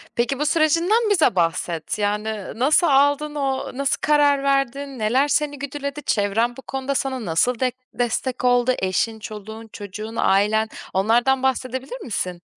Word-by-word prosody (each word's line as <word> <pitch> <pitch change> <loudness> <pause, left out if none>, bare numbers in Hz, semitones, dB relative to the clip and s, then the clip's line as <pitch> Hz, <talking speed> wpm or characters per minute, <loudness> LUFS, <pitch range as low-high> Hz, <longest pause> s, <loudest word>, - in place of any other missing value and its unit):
Peki 245 +3 0
bu 300 - 0
sürecinden 335 +9 +2
bize 330 - +3
bahset 170 +1 -1
yani 210 0 -1
nasıl 295 +9 +3
aldın, 285 +1 +2
o 270 -2 -2
nasıl 275 0 +1
karar 290 -2 +3
verdin, 275 -1 -1
neler 250 +7 +2
seni 290 -1 0
güdüledi, 280 +1 -5
çevren 225 +3 0
bu - - -8
konuda 270 +1 -4
sana 260 -4 -2
nasıl 225 +9 +1
dek 255 -1 0 0.2
destek 245 +1 -2
oldu, 245 0 +3
eşin, 205 +4 -1
çoluğun, 220 +1 -9
çocuğun, 210 +2 -7
ailen 220 +2 +2 0.2
onlardan 240 +7 +2
bahsedebilir 260 - -2
misin? 180 -6 -4
255 Hz, 145 wpm, -22 LUFS, 220-280 Hz, 0.2 s, bize